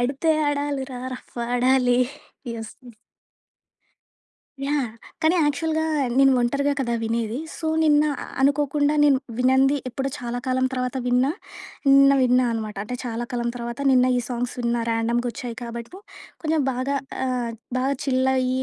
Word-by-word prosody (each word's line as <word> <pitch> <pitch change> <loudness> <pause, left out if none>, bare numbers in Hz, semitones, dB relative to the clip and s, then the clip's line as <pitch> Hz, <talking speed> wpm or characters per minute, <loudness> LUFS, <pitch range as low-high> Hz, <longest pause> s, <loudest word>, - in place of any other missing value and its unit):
ఆడితే 275 +6 +1 0.2
ఆడాలిరా 280 -3 -2 0.2
రఫ్ - - -14 0.2
ఆడాలి'. 250 0 +3 0.5
యస్. 225 -1 -7
హ్మ్. 240 - -13 1.7
యాహ్! 285 +1 +1 0.4
కానీ 315 +3 +4
యాక్చువల్‌గా 315 +2 0 0.3
నేను 270 0 +6
ఒంటరిగా 280 +4 +1
కదా 235 -3 0
వినేది! 225 +1 -1 0.2
సో 320 - -3 0.2
నిన్న 295 -1 +5 0.4
అనుకోకుండా 290 +1 +2
నేను 280 -2 +5 0.2
వినంది 265 +3 +4
ఎప్పుడో 265 +2 -3
చాలా 245 -1 -4
కాలం 260 0 +1
తర్వాత 255 0 -2
విన్నా, 250 +3 +3 0.6
నిన్న 275 0 +7
విన్నా 250 0 +4
అనమాట. 215 -2 -4
అంటే 250 +3 -5
చాలా 235 0 -3
కాలం 240 -1 -1
తర్వాత 235 +1 -5
నిన్న 255 -1 +4
ఈ - - +1
సాంగ్స్ 245 -1 -3
విన్నా 235 -1 0
ర్యాండమ్‌‌గొచ్చాయి 235 +2 -1
కాబట్టి 235 0 -6 0.5
కొంచెం 315 -1 +1
బాగా 260 +3 -1 0.3
ఆహ్, 245 -2 -1 0.3
బాగా 270 +2 +1
చిల్ 260 -1 +2
అయ్యి 255 0 0
255 Hz, 135 wpm, -23 LUFS, 240-280 Hz, 1.7 s, నిన్న